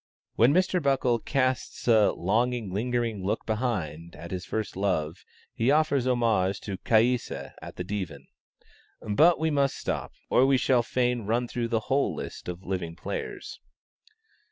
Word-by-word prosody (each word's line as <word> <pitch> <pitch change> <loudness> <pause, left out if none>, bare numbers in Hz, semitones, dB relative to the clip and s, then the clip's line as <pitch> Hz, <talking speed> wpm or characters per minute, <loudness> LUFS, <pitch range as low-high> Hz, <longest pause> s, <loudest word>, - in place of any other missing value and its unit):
When 120 +4 +5
Mr. 185 +2 +2
Buckle 135 -4 +2
casts 130 0 -1
a 110 -3 +5
"longing, 115 +2 0
lingering 115 -1 -1
look 100 - -2
behind" 90 - -3
at 85 +1 -9
his 90 -1 -4
first 110 -2 -3
love, 90 -4 -1 0.3
he 115 +3 +1
offers 145 -3 +3
homage 110 -6 +2
to 100 -3 -5
Caïssa 120 +2 +1
at - - -9
the 90 - -4
Divan. 95 -3 -5 0.8
But 155 +12 +5
we 160 0 +1
must 140 -2 +1
stop, - - -3 0.2
or 125 - +4
we 135 -1 +4
shall 125 -1 +3
fain 120 -2 -1
run 120 +3 +1
through 120 0 -2
the 115 -1 0
whole 135 +5 0
list - - -7
of 90 +1 -6
living 90 -3 -3
players. 430 - -6
115 Hz, 155 wpm, -27 LUFS, 95-130 Hz, 0.8 s, When